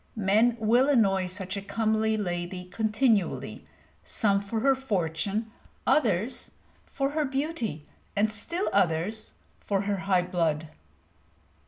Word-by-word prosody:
Men 220 +3 +3
will 240 +5 +4
annoy 195 -8 +3
such 185 +1 -4
a 200 - -3
comely 220 +1 0
lady 180 -2 -3
continually, 215 +1 0 0.4
some 200 -3 +1
for 220 +2 -3
her 270 +2 +5
fortune, 210 -3 -2 0.3
others 240 - +1 0.4
for 275 0 -1
her 305 +1 0
beauty, 265 - -3 0.3
and 210 +1 +2
still 340 - -2
others 195 +4 0 0.3
for 195 -2 -1
her 200 0 -1
high 190 -1 +2
blood. 165 -4 -1
210 Hz, 120 wpm, -27 LUFS, 185-230 Hz, 0.4 s, her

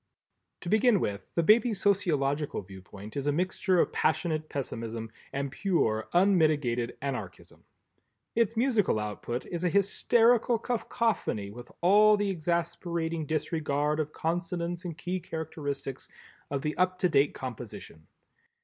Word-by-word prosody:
To 175 - -5
begin 215 +1 +4
with, 100 -7 -3
the 170 - +2
baby's 220 +3 +4
sociological 150 - +1
viewpoint 95 +2 -11
is 140 0 -2
a - - +4
mixture 185 +3 +1
of - - +2
passionate 155 -1 0
pessimism 115 -4 -4 0.2
and 140 0 -3
pure 130 - 0
unmitigated 155 -10 +2
Anarchism. 125 -10 -6 0.7
Its 230 -1 +1
musical 230 - +2
output 105 +3 -4
is 175 -1 -5
a 180 - +3
hysterical 230 +5 +3
cacophony 225 - -1
with 120 +3 -11
all 210 +4 +6
the 205 -1 0
exasperating 170 -1 -2
disregard 150 -1 0
of 155 -1 -1
consonance 170 +1 -2
and 165 -3 -5
key 180 +4 -3
characteristic 145 -5 -5 0.5
of 140 -1 -2
the 150 - -1
up 185 +1 +2
to 180 - +2
date 140 -3 +2
composition. 115 -10 -8
160 Hz, 130 wpm, -29 LUFS, 135-185 Hz, 0.7 s, all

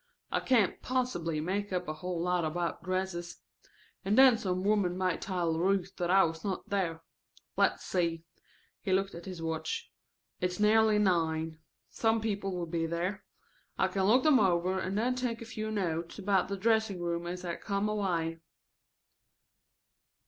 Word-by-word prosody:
I - - +2
can't 230 -8 +2
possibly 210 -12 -1
make 200 +5 -2
up 180 -1 -2
a 155 - -2
whole 175 +2 -4
lot 180 0 +1
about 170 +2 -2
dresses. 185 -1 -3 0.7
And 200 +2 +1
then 265 -2 +8
some 185 -4 -2
woman 200 -3 +2
may 185 -2 +1
tell 175 -4 -1
Ruth 190 +1 +1
that 175 -1 -1
I 190 +1 +6
was 165 -1 -2
not 195 -3 -3
there. 175 -5 -1 0.5
Let's - - +2
see," 170 -3 -1 0.6
he 190 - 0
looked 195 +1 +1
at 170 - -9
his 180 -3 -6
watch, 165 - -3 0.5
"it's 180 +1 -2
nearly 215 0 +5
nine. 160 -5 +1 0.3
Some 225 0 +2
people 205 -3 -2
will 175 -1 -2
be 165 0 -1
there. 175 +4 -2 0.5
I - - +2
can 190 -1 0
look 245 +6 +5
them 305 -4 +6
over 185 -1 +2
and 190 +2 -2
then 245 +4 +1
take 250 -2 -2
a 230 - -8
few 220 -1 -4
notes 170 -5 -2
about 195 -2 +1
the 200 +1 -3
dressing 220 -2 +1
room 170 0 -2
as 180 +1 -5
I 170 - -2
come 200 0 -1
away." 175 -6 -1
185 Hz, 165 wpm, -31 LUFS, 170-210 Hz, 0.7 s, then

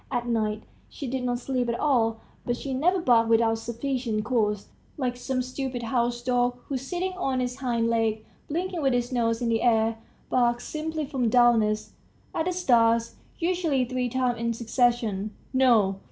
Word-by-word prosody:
At 245 -2 -1
night 215 -2 -1 0.3
she 285 - -7
did 260 0 -3
not 245 -1 0
sleep 250 -1 -2
at 235 - -2
all, 225 -6 +2 0.2
but 240 0 -1
she 270 +1 -4
never 350 +8 +2
barked 235 -7 +3
without 225 0 +3
sufficient 235 -2 -2
cause, 210 -4 0 0.3
like 250 -4 -1
some 255 +1 -2
stupid 255 -1 -4
house 240 0 0
dog, 245 0 +1
who, 275 - -1
sitting 355 +8 -3
on 265 -6 0
its 250 0 -2
hind 235 -3 0
legs, 225 -1 0 0.2
blinking, 350 +2 -2
with 270 -3 +2
its 245 0 -1
nose 230 -1 0
in 235 - +1
the 225 -1 +1
air, 225 -1 +2 0.3
barks 240 -1 +1
simply 310 0 -3
from 260 -4 0
dullness, 225 -3 +3 0.4
at 320 - -1
the 365 - 0
stars, 235 -9 +3 0.2
usually 335 -7 +1
three 250 0 -2
times 250 -1 0
in 235 0 0
succession. 230 -3 0 0.2
No! 225 -7 +4
245 Hz, 170 wpm, -26 LUFS, 230-265 Hz, 0.4 s, No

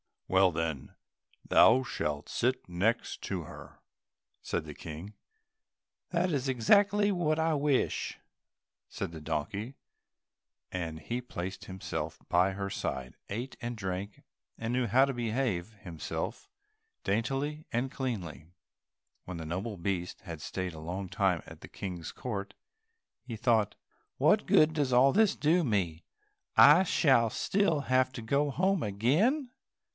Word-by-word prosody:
"Well, 95 0 +4
then, 80 -4 -3 0.5
thou 130 - +6
shalt 75 - -3
sit 125 +2 0
next 100 +7 -1
her - - -8
too," 90 -5 -6 0.7
said - - -2
the - - -8
King. 80 +6 -8 1.0
"That 180 +1 +1
is 140 -3 -1
exactly 200 - +4
what 165 -5 +1
I 160 0 +2
wish," 145 -2 0 0.7
said - - -5
the 80 - -8
donkey, 85 - -3 1.0
and 80 -3 -4
he 120 +11 -3
placed 95 -5 -6
himself 95 0 -5
by 90 +2 +4
her 100 0 -3
side, 65 -8 -4
ate 120 +6 -5
and 120 0 -3
drank, 95 0 -5 0.3
and 115 +1 -3
knew 125 -1 +1
how 125 +6 +5
to 135 - -2
behave 115 -5 -1
himself 85 - -5 0.6
daintily 135 +8 -1
and 125 +3 0
cleanly. 95 - -4 0.8
When 90 - -6
the 80 - -6
noble 95 +7 -3
beast 90 0 -3
had 85 -5 -8
stayed 90 +2 -4
a 80 - -9
long 90 +4 -5
time 95 -5 +1
at - - -12
the - - -10
King's 90 -4 -6
court, 100 -5 -5 0.7
he 120 -3 -7
thought, 110 -2 +2 0.4
"What - - +3
good 155 +1 +5
does 145 -5 0
all 130 +3 +6
this 210 +2 +4
do 165 +4 +3
me, 90 - -1 0.5
I 155 +6 +8
shall 130 -10 +4
still 170 - +1
have 130 -1 +2
to 120 - -6
go 140 +6 +1
home 185 +5 +1
again?" 155 - +2
115 Hz, 140 wpm, -30 LUFS, 90-135 Hz, 1.0 s, I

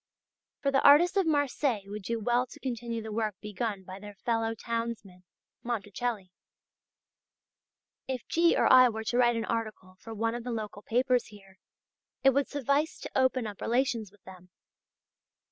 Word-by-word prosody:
For 275 - +2
the 270 - +3
artists 320 +7 +6
of 390 -4 +2
Marseilles 285 -6 +1
would 205 +1 -7
do 230 +4 -3
well 240 +3 +1
to - - -13
continue 235 -3 -4
the 220 - -6
work 215 -2 -1
begun 210 -1 -4
by 185 +1 -9
their 205 0 -10
fellow 225 +1 -1
townsman 230 -5 -5 0.4
Monticelli. 220 -3 -3 1.8
If 260 -2 -4
G. 335 +1 +3
or - - +3
I 255 -1 +8
were 220 -1 -5
to 240 +2 -1
write 240 -1 +4
an 225 -1 -2
article 215 -5 -4
for 225 -1 -9
one 225 +2 0
of 240 0 -5
the 250 - -5
local 215 -3 -5
papers 250 +3 +1
here, 195 -2 -16 0.6
it 270 - +7
would 280 +1 +1
suffice 285 +2 0
to - - -7
open 260 -2 +2
up 205 -2 -7
relations 235 -4 0
with 205 -1 -25
them. 185 -1 -14
230 Hz, 165 wpm, -29 LUFS, 210-255 Hz, 1.8 s, I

